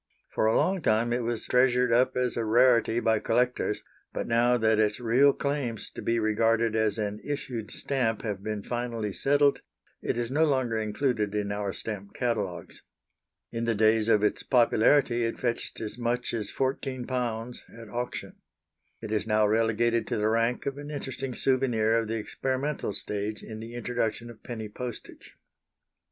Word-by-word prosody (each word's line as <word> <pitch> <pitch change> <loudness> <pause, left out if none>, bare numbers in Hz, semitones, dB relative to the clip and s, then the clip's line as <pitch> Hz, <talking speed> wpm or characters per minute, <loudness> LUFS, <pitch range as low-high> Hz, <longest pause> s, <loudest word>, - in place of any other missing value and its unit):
For 110 - +2
a 110 - +3
long 190 -1 +1
time 115 -1 +2
it 125 - 0
was 115 -1 -3
treasured 125 -1 +3
up 130 +2 +3
as 125 -2 0
a 115 - -1
rarity 120 0 +4
by 110 -2 +2
collectors, 120 -1 0 0.3
but - - -3
now 120 +2 +3
that 110 -1 +2
its 105 +1 +2
real 125 +4 +5
claims 140 -6 -3
to - - -8
be 115 - +1
regarded 115 +1 +2
as 110 -1 +1
an 105 -1 -2
issued 130 -7 -4
stamp 125 -6 -1
have 105 -4 -3
been 105 0 -4
finally 115 -3 -3
settled, 145 0 +3 0.4
it - - -1
is 120 0 -2
no 150 +4 +3
longer 130 -6 +1
included 110 -1 -1
in 100 -1 -1
our 100 -1 -2
stamp 100 -1 -6
catalogues. 105 -8 -3 0.7
In 115 0 -2
the 115 -1 +1
days 110 +1 +3
of 105 -2 +4
its 105 - +1
popularity 120 0 +3
it 115 - -2
fetched 120 -2 -2
as 110 +2 -5
much 120 +1 -1
as 110 -3 -3
£14 125 -3 -2 0.2
at 115 - -10
auction. 120 +2 -5 0.7
It 110 - -5
is 110 0 0
now 110 0 +3
relegated 115 +2 +2
to - - -1
the 105 +1 +1
rank 115 +2 +1
of 140 0 -3
an 145 0 -7
interesting 135 -3 -4
souvenir 120 -4 +2
of 115 - -3
the 115 - -2
experimental 130 +5 -2
stage 105 +2 -4
in 110 -1 -8
the 115 +2 -8
introduction 120 -1 -2
of 115 - -16
Penny 110 -3 -6
Postage. 120 +2 -8
115 Hz, 170 wpm, -28 LUFS, 110-125 Hz, 0.7 s, real